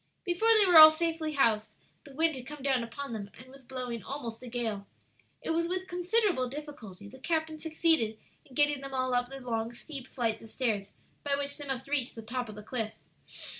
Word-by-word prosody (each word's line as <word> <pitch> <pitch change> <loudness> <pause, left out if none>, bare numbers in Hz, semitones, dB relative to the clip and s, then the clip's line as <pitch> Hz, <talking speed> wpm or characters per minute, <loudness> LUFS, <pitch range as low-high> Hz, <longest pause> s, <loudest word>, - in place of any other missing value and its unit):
Before 355 +5 +1
they 420 - +6
were 350 -4 +8
all 310 0 +13
safely 320 -1 -1
housed, 225 -6 +2 0.3
the 280 -2 -13
wind 320 0 +2
had 255 -1 -8
come 295 -2 -8
down 265 -3 +2
upon 235 +2 -6
them 200 -2 -5
and 255 +2 -14
was 270 0 -14
blowing 245 -2 -5
almost 235 -1 -6
a 255 - -8
gale. 220 -4 -3 0.6
It - - -1
was 335 +1 +1
with 370 +1 -2
considerable 360 - +1
difficulty 245 -9 -9
the 260 +6 -13
captain 315 +1 -1
succeeded 315 -8 +2 0.3
in 260 - -17
getting 290 -1 +3
them 275 -1 -6
all 255 -1 0
up 245 0 +1
the 270 0 -7
long 230 -2 -2
steep 270 +1 -8
flights 230 -5 -1
of 225 - -12
stairs 210 -5 -2 0.3
by 285 -1 +1
which 285 0 -3
they 290 -2 -7
must 265 -1 -3
reach 275 -3 -1
the 225 - -8
top 245 +1 -3
of 210 - -8
the 210 - -9
cliff. 220 -1 -3
265 Hz, 210 wpm, -30 LUFS, 235-310 Hz, 0.6 s, all